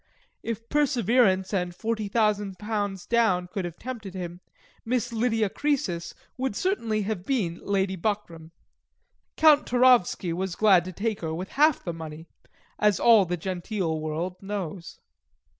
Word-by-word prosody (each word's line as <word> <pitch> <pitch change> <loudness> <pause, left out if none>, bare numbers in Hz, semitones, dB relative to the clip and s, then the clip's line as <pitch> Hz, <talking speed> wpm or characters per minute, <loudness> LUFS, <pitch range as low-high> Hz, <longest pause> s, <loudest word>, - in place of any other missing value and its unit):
If 230 0 -5
perseverance 235 -9 +2
and 180 -2 -1
forty 220 +1 -2
thousand 205 -2 0
pounds 205 -2 -3
down 205 -7 +2
could 190 0 -4
have 175 -1 -7
tempted 220 -7 -7
him, 175 -1 -6 0.4
Miss 245 0 -1
Lydia 225 -1 +1
Croesus 195 - -2 0.2
would 260 -5 -2
certainly 230 - 0
have 200 -3 -3
been 190 -9 -1
Lady 195 -1 0
Buckram. 170 -4 -3 0.9
Count 310 -2 +5
Towrowski 245 -8 +3
was 185 +1 -3
glad 190 -5 +5
to 185 - -5
take 215 +3 -3
her 160 -1 -3
with 185 +3 -5
half 300 +1 +3
the 170 - -3
meney, 160 -1 -8 0.5
as 210 -3 +3
all 225 -4 +6
the 180 0 -2
genteel 180 -1 -3
world 160 +4 -3
knows. 195 -4 -5
200 Hz, 140 wpm, -26 LUFS, 180-230 Hz, 0.9 s, all